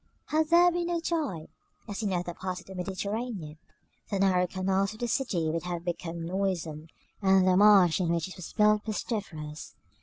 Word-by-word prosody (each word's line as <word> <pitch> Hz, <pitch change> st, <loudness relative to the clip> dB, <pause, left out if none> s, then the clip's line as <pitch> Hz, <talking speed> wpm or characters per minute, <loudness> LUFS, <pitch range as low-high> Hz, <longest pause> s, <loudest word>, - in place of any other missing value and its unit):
Had 310 Hz, 0 st, +1 dB
there 350 Hz, +1 st, +6 dB
been 345 Hz, 0 st, -1 dB
no 345 Hz, -1 st, 0 dB
tide, 300 Hz, -, -2 dB, 0.4 s
as 205 Hz, 0 st, -4 dB
in 205 Hz, -3 st, -1 dB
other 175 Hz, -1 st, -2 dB
parts 185 Hz, +1 st, -4 dB
of -, -, -15 dB
the 190 Hz, -, -10 dB
Mediterranean, 190 Hz, -2 st, -4 dB, 0.5 s
the 200 Hz, -, -1 dB
narrow 185 Hz, -2 st, +3 dB
canals 190 Hz, +2 st, 0 dB
of -, -, -15 dB
the 240 Hz, -, -1 dB
city 210 Hz, -10 st, 0 dB
would 165 Hz, +1 st, -2 dB
have 175 Hz, 0 st, -5 dB
become 170 Hz, -1 st, -4 dB
noisome, 170 Hz, -4 st, -2 dB, 0.3 s
and 190 Hz, -1 st, +4 dB
the 185 Hz, -, +5 dB
marsh 195 Hz, -4 st, +6 dB
in 175 Hz, -, 0 dB
which 170 Hz, -1 st, 0 dB
it 185 Hz, -, -10 dB
was 180 Hz, -, -8 dB
built 210 Hz, 0 st, +4 dB
pestiferous. 185 Hz, -9 st, -5 dB
190 Hz, 185 wpm, -28 LUFS, 175-210 Hz, 0.5 s, there